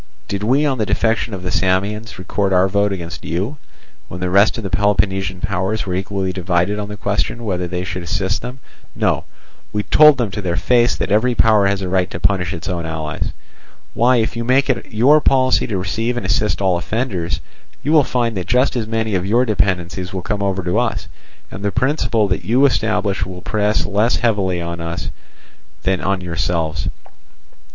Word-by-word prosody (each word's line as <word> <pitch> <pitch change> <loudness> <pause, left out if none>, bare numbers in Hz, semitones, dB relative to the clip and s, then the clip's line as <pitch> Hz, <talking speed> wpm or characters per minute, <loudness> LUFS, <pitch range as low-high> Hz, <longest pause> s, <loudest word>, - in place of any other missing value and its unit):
Did 100 - -3
we 130 +8 +2
on 135 -4 0
the 110 - +1
defection 115 0 0
of 90 - -8
the 90 - -2
Samians 100 +5 0
record 95 +1 -1
our 90 +1 +4
vote 100 +1 +1
against 85 -5 -6
you, 95 - -3 0.5
when 90 - -7
the 90 0 -2
rest 100 +5 +4
of 115 - -5
the 95 - -4
Peloponnesian 95 -3 +1
powers 100 +3 -1
were 90 - -3
equally 95 0 -2
divided 90 +2 0
on 105 - -4
the 105 - -7
question 100 +3 -2
whether 90 -3 -1
they 90 +1 -3
should 90 0 -4
assist 95 +2 -1
them? 125 +2 -6 0.4
No, - - 0 0.5
we 105 -1 -1
told 150 +3 +6
them 120 -6 -1
to 105 - -4
their 90 -3 -1
face 120 +8 +3
that - - -3
every 120 +4 +3
power 110 -4 +4
has 100 -1 0
a - - -2
right 90 0 +1
to - - -6
punish 90 -1 +1
its 85 -2 -6
own 90 -3 -2
allies. 80 -2 -3 0.6
Why, 125 +2 +4
if 115 -1 0
you 115 - -2
make 130 +3 +3
it 130 - -5
your 135 +8 +5
policy 130 -2 +3
to 105 - -2
receive 110 +7 -2
and 120 - -3
assist 105 +1 0
all 90 -2 +2
offenders, 95 -5 -2 0.4
you 145 - 0
will 155 -2 +6
find 120 -3 -1
that 90 - -4
just 125 +3 +2
as 115 -3 -2
many 110 -1 -1
of 90 -2 +1
your 115 +6 +2
dependencies 95 -3 -1
will 95 - -3
come 105 -2 -2
over 95 -2 -1
to 90 +1 +1
us, - - -2 0.4
and 100 - -8
the 100 - 0
principle 125 -4 +1
that 90 - -1
you 125 +5 +3
establish 105 -6 +1
will 90 -1 -7
press 105 0 0
less 105 +4 +2
heavily 100 -7 +1
on 85 0 -4
us 85 0 -4 0.7
than 95 0 0
on 95 -1 0
yourselves. 85 -2 -2
100 Hz, 200 wpm, -19 LUFS, 90-115 Hz, 0.7 s, told